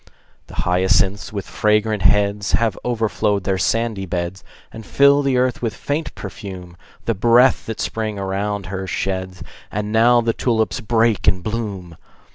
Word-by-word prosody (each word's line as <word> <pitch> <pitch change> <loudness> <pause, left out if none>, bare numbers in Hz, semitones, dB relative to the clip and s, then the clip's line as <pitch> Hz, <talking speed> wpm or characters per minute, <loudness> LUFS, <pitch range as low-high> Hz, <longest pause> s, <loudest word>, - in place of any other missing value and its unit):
The - - -12
hyacinths, 95 +2 +1
with 100 -2 -5
fragrant 105 0 +1
heads, 100 +2 +2
Have 115 -4 +2
overflowed 110 -4 0
their 95 0 -1
sandy 115 -4 0
beds, 90 +2 -4 0.3
And 110 - -9
fill 140 +5 +4
the 135 -2 +1
earth 125 -1 0
with 115 -3 -2
faint 150 +2 -3
perfume, 95 -3 -8 0.3
The 115 - +1
breath 120 +5 +4
that 115 - -5
Spring 110 -2 -3
around 100 +1 -2
her 95 +1 -5
sheds. 95 -1 -3 0.3
And 105 0 -3
now 120 +2 +5
the 115 -1 0
tulips 115 +1 0
break 115 -1 +1
in 95 - +3
bloom! 100 -5 -5
105 Hz, 150 wpm, -20 LUFS, 95-115 Hz, 0.3 s, now